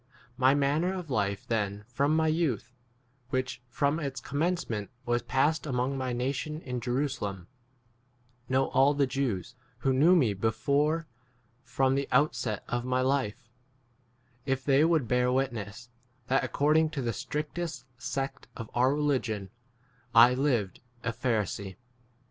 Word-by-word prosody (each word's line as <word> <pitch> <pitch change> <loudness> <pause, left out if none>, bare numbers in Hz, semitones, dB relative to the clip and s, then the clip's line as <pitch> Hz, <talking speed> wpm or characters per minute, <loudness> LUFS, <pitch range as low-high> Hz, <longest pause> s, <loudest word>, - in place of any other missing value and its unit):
My 130 +1 +4
manner 150 +6 +1
of 175 -6 -6
life 100 -4 -1
then 105 -2 -1
from 140 +5 +1
my 160 0 +3
youth, 140 - 0 0.6
which 130 -1 -2
from 145 +5 +1
its 140 -4 -3
commencement 145 - -2 0.2
was 120 -1 +1
passed 155 +4 +1
among 130 0 0
my 130 -1 -2
nation 135 +5 -2
in 125 -2 -4
Jeru 125 +4 0
5 - - -7
salem, 95 -3 -5 1.0
know 130 +1 +2
all 140 +2 +4
the 140 -1 +3
Jews, 130 -6 -2 0.3
who 135 - +2
knew 160 +8 +5
me 125 - +3
before 145 - +1 0.6
from 130 +1 +1
the 140 0 0
outset 125 -5 +1
[of 120 -1 -2
my 130 0 0
life], 130 -3 -1 1.0
if 135 -1 -1
they 140 +1 +5
would 160 -6 +2
bear 125 +1 +2
witness, 120 -3 -2 0.4
that 135 +2 +2
according 155 +2 +2
to 135 - -1
the 115 -1 -1
strictest 150 -2 -4
sect 135 -1 -4
of 115 -2 -7
our 130 +3 +3
religion 125 -10 -1 0.6
I 115 +2 +9
6 125 - -1
lived 120 -9 0 0.2
a 115 - -1
Pharisee. 105 -5 -2
130 Hz, 145 wpm, -29 LUFS, 120-145 Hz, 1.0 s, I